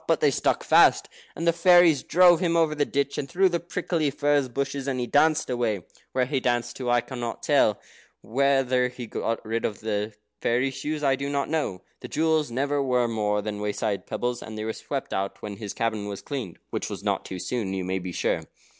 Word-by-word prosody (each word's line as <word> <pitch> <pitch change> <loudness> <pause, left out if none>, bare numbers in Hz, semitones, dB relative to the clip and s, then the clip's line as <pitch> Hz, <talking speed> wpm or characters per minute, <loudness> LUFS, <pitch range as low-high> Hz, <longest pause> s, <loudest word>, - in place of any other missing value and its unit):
But - - +3
they - - +4
stuck - - 0
fast, - - +5 0.3
and 165 - -3
the 170 - +4
fairies 170 -4 +6
drove 175 0 +5
him 170 -2 +1
over, 160 -2 +3
the 145 -1 +1
ditch, 140 0 -1
and 135 - -4
through 190 +4 +3
the 170 -1 0
prickly 170 -3 -1
furze 145 -1 +1
bushes, 135 +2 -3
and 130 -2 -1
he 125 - -1
danced 155 +5 +3
away. 115 -7 -1 0.3
Where 130 -1 +1
he 135 +1 -1
danced 120 -2 -1
to, 125 -2 -3
I 120 0 +4
cannot 120 -1 -6
tell 145 -6 +4
you. 105 - -4 0.5
Whether 130 -1 +3
he 125 0 -8
ever 115 - -5
got 115 0 -2
rid 115 +1 -2
of 105 - -3
the 105 0 -2 0.3
fairy 125 +3 +1
shoes, 150 +3 -4
I 135 -1 +3
do 140 +1 -4
not 140 -1 -1
know. 145 - -1 0.2
The - - -8
jewels 160 -3 +1
never 140 +4 0
were 125 -3 +2
more 105 -2 0
than 105 -1 -4
wayside 105 -1 -2
pebbles, 120 0 -2
and 110 -1 -8
they 110 - -3
were 110 0 -2
swept 135 +3 -5
out 95 +1 -2
when 105 -2 -6
his 105 -1 -5
cabin 110 -3 -2
was 100 -1 -6
cleaned, 130 - -5
which - - -3
was - - -6
not - - 0
too 95 - -6
soon, 105 +1 -3
you 95 - -2
may 95 +1 -2
be 90 0 -6
sure. - - 0
125 Hz, 225 wpm, -26 LUFS, 110-145 Hz, 0.5 s, fairies